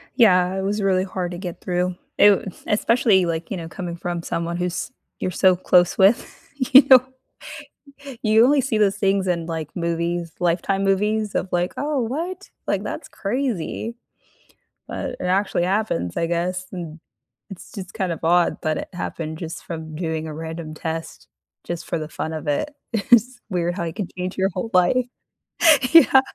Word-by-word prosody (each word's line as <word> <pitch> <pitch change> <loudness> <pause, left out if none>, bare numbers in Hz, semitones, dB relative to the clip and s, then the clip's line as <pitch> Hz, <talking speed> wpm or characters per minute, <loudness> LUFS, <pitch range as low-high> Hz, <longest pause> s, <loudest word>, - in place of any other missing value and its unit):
Yeah, 185 -6 +4
it - - -1
was 205 +2 -1
really 190 -1 +2
hard 185 -2 -4
to 175 - -6
get 180 -2 -7
through. 180 0 -1 0.2
It 200 -2 +4
Especially, 210 -3 +3
like, 165 -1 -3
you 195 - -3
know, 165 -2 -6
coming 175 0 -6
from 175 0 -4
someone 170 +1 -3
who's 180 +6 -3 0.3
you're - - -1
so 185 0 +4
close 175 0 +3
with 195 +5 +3 0.4
you 270 - +12 1.4
you 220 +1 +5
only 280 +1 +4
see 230 -4 0
those 200 -2 +3
things 195 -1 +1
in, 170 -2 0
like, 160 -3 -4
movies, 170 0 -2
Lifetime 180 +3 +1
movies 210 +2 +1
of, 190 - -1
like, 175 +1 0
"Oh, 290 -1 -1
what? 335 - -4 0.2
Like, - - 0
that's - - -6
crazy." 230 -1 -3 0.9
But - - -4
it - - -5
actually 185 -1 +1
happens, 185 - -1
I 165 - +1
guess, 180 +2 -2
n 165 -3 -7 0.5
it's 190 - -11
just 190 -4 -8
kind 190 -5 -2
of 165 - -6
odd, 175 +1 +3
but 155 -1 0
it - - -6
happened 160 -3 -5
just 165 -1 -6
from 160 -2 -7
doing 160 -1 -3
a 155 - -6
random 160 0 -6
test 165 +1 -6 0.4
just 175 -1 -5
for - - -2
the 155 - -5
fun 160 0 -4
of 155 -1 -6
it. 145 - -1 0.2
It's 240 +3 +3
weird 175 -2 -1
how 185 - -3
you 165 - -4
can 195 -4 -4
change 180 +1 -3
your 190 0 +2
whole 205 +4 -4
life. 185 +8 +3 0.9
Yeah 325 -5 +8
180 Hz, 175 wpm, -22 LUFS, 170-205 Hz, 1.4 s, you